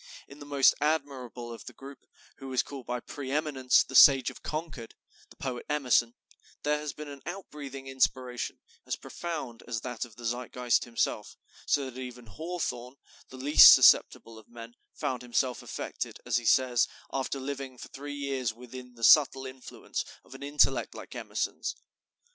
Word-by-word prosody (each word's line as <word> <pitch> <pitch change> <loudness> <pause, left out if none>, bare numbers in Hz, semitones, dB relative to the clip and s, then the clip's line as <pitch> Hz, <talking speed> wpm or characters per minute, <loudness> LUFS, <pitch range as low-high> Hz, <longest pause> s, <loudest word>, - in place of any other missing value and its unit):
In 140 +1 -14
the 145 - -10
most 140 -2 +5
admirable 135 -6 -2
of 115 - -11
the - - -9
group, 135 +1 -13 0.3
who 135 -1 -8
is 130 - +2
called 135 -3 -9
by 125 0 -3
preëminence 140 -1 +1
"the - - -11
Sage 135 -1 +7
of - - -15
Concord," 155 -7 -6 0.3
the - - -17
poet 130 -2 -5
Emerson, 125 -5 +2 0.5
there 150 0 +1
has 150 -1 -4
been 150 +1 -9
an 140 -1 -9
out 185 +2 -7
breathing 140 -2 -8
inspiration 130 -2 -1 0.3
as - - -1
profound 155 -9 -6
as 115 -2 -3
that 125 -3 -4
of 115 -3 -11
the 120 +1 -10
Zeitgeist 125 +1 0
himself; 115 -3 -2 0.3
so 140 -1 +2
that 130 0 -7
even 125 -1 -8
Hawthorne, 125 - -5 0.3
the 130 - -11
least 145 +4 +9
susceptible 115 -1 +4
of 110 - -20
men, 115 0 -11 0.2
found 125 -2 -3
himself 125 +1 -1
affected - - -6
as - - +1
he 120 - -4
says, 125 -1 +3 0.3
"after 135 0 -2
living 135 -1 -6
for - - -10
three 145 +1 -7
years 135 -5 -2
within 125 +1 -11
the 115 - -12
subtle 135 0 +6
influence 130 -1 -6 0.2
of - - -14
an 135 - -11
intellect 145 +1 +1
like - - -9
Emerson's." - - -3
130 Hz, 170 wpm, -29 LUFS, 120-140 Hz, 0.5 s, least